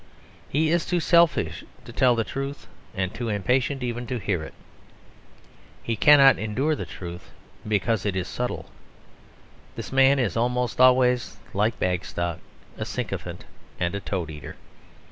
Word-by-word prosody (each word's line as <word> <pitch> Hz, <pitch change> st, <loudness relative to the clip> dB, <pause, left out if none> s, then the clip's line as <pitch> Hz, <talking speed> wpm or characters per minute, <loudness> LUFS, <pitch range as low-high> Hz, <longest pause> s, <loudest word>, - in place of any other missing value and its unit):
He 155 Hz, +3 st, +1 dB
is 170 Hz, 0 st, +2 dB
too 180 Hz, -, +1 dB
selfish 165 Hz, -, +3 dB, 0.2 s
to 120 Hz, -, -10 dB
tell 125 Hz, -1 st, +4 dB
the 115 Hz, -, +1 dB
truth 135 Hz, +4 st, -5 dB, 0.3 s
and 95 Hz, -1 st, -2 dB
too 115 Hz, +1 st, -4 dB
impatient 125 Hz, +6 st, 0 dB
even 120 Hz, 0 st, -3 dB
to 125 Hz, -, -2 dB
hear 95 Hz, -6 st, -1 dB
it. -, -, -9 dB, 1.3 s
He 115 Hz, -, -1 dB
cannot 140 Hz, +3 st, +7 dB
endure 125 Hz, +9 st, 0 dB
the -, -, -6 dB
truth, 85 Hz, -1 st, -8 dB, 0.4 s
because 105 Hz, 0 st, +1 dB
it 100 Hz, -2 st, -1 dB
is 90 Hz, -1 st, -2 dB
subtle. 125 Hz, 0 st, -4 dB, 1.0 s
This -, -, -7 dB
man 135 Hz, +1 st, +5 dB
is 120 Hz, -9 st, 0 dB
almost 125 Hz, +1 st, 0 dB
always 125 Hz, -1 st, +4 dB, 0.2 s
like 105 Hz, +2 st, +1 dB
Bagstock 85 Hz, -1 st, -2 dB, 0.4 s
a -, -, -2 dB
sycophant -, -, -5 dB, 0.3 s
and 85 Hz, 0 st, 0 dB
a 100 Hz, -, -2 dB
toad 90 Hz, -4 st, -4 dB
eater. 75 Hz, -4 st, -9 dB
120 Hz, 145 wpm, -25 LUFS, 95-135 Hz, 1.3 s, cannot